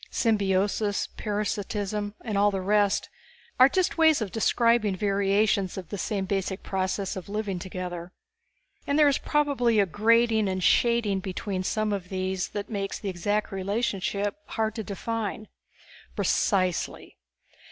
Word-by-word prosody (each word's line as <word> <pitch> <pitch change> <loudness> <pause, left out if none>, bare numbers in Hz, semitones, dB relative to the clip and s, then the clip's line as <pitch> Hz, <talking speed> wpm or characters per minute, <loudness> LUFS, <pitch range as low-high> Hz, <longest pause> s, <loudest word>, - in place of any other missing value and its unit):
Symbiosis, 205 -1 +1
parasitism 205 0 -2
and 220 -4 -4
all 205 +1 +4
the 195 -1 -2
rest 205 +1 +2 0.5
are 255 +1 +8
just 365 +1 0
ways 320 -2 +5
of 215 -5 -3
describing 230 -2 +2
variations 200 0 +1
of 185 -4 -7
the 205 - -4
same 200 -2 -2
basic 190 0 -2
process 190 0 -2
of 190 0 -7
living 205 -3 -2
together. 180 -1 -6 0.8
And 285 - +1
there 300 -1 +6
is 280 - +2
probably 275 -7 +2
a 200 - +5
grading 220 +2 +3
and 185 -1 -2
shading 230 -2 +3
between 190 +1 -3
some 215 +2 -1
of 185 -3 -4
these 190 0 -2
that 205 0 -5
make 200 -3 -3
the 200 - -4
exact 205 +4 -1
relationship 200 0 -1
hard 220 -1 -1
to 220 -1 -4
define." 215 +1 -4 0.7
"Precisely. 185 -4 0
205 Hz, 140 wpm, -26 LUFS, 190-220 Hz, 0.8 s, are